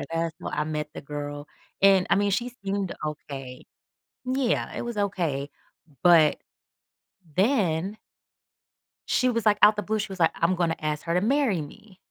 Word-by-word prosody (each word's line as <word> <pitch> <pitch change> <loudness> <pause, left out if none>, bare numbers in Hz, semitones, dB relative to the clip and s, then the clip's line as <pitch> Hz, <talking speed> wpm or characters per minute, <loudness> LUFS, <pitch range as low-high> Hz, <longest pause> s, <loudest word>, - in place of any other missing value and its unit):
duh - - -4
that's 165 0 -1
how - - -4
I 150 - -1
met 150 -1 -3
the - - -6
girl, 145 0 -6 0.3
and 195 -1 +5
I - - +5
mean, 200 0 +2
she 240 +5 -1
seemed 195 -1 -2
okay. 135 -4 -7 0.6
Yeah, 255 -1 0
it - - -3
was 235 -3 -5
okay. 165 -8 -1 0.5
But 165 -4 +6 1.0
then 195 - +1 1.1
she 255 - +2
was, 230 -2 -1
like, 205 -1 +4
out 210 0 +7
the 210 - -2
blue, 215 0 -1
she 200 -1 -4
was 190 - -9
like, 165 - +4
"I'm 170 +2 +2
gonna 170 -2 0
ask 150 -1 -2
her 170 - -1
to 180 - +3
marry 240 - +2
me." 185 +7 -11
180 Hz, 175 wpm, -26 LUFS, 155-210 Hz, 1.1 s, out